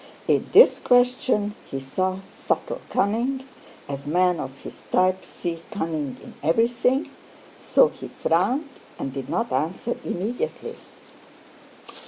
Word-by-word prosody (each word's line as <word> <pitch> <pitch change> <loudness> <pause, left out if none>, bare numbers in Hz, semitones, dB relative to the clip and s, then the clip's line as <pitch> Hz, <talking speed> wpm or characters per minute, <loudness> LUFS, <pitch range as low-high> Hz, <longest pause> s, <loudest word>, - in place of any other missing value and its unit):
In - - +2
this - - +8
question 245 -4 +2 0.2
he 135 - -3
saw 185 +8 -2
subtle 190 - -3
cunning, 240 +7 0 0.4
as 140 0 -6
men 180 +2 +2
of 135 - -5
his - - -9
type 185 0 +3
see 170 -2 -5
cunning 160 -9 -3
in - - -11
everything, 235 - +2 0.5
so - - +4
he - - -9
frowned 300 - +1 0.3
and 135 - -4
did 135 -2 -5
not 235 +1 -1
answer 185 +9 -1
immediately. 245 - -3
190 Hz, 120 wpm, -24 LUFS, 165-245 Hz, 0.5 s, this